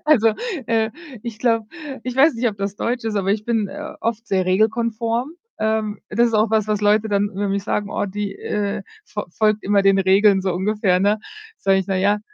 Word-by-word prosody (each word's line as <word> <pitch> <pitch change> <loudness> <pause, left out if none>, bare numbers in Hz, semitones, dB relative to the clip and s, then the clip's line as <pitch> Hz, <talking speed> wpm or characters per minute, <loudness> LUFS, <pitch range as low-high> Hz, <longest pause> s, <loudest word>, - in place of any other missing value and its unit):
Also, 280 -8 +5 0.4
äh, 225 -1 +1 0.3
ich 230 -3 -6
glaube 230 -3 +1 0.4
ich 250 0 -4
weiß 290 +3 +5
nicht, 235 +1 +1
ob 205 - -6
das 200 0 -3
deutsch 240 +2 -2
ist, 220 -2 -1
aber 195 -1 0
ich 215 0 -2
bin, 225 -3 0
äh, - - -7
oft 230 0 -2
sehr 190 -3 +1
regelkonform. 230 - 0 0.3
Ähm, 220 -1 -1
das 235 +3 +3
ist 230 - -3
auch 215 0 +3
was, 220 -2 +2
was 210 -1 0
Leute 210 +1 +3
dann 200 -1 +2
über 200 +1 -3
mich 200 0 -1
sagen: 205 -1 -1
„Oh, - - -1
die, 205 +1 -4
äh, 205 0 -3 0.2
fo 210 0 -5
folgt 215 +3 +1
immer 200 0 +2
den 195 0 +4
Regeln“, 195 +1 +4
so 190 -1 0
ungefähr, 190 0 +1
ne? 205 +2 +2 0.4
Sage 195 0 +3
ich: 190 - -2
„Naja.“ 200 +2 +1
210 Hz, 210 wpm, -21 LUFS, 200-225 Hz, 0.4 s, Also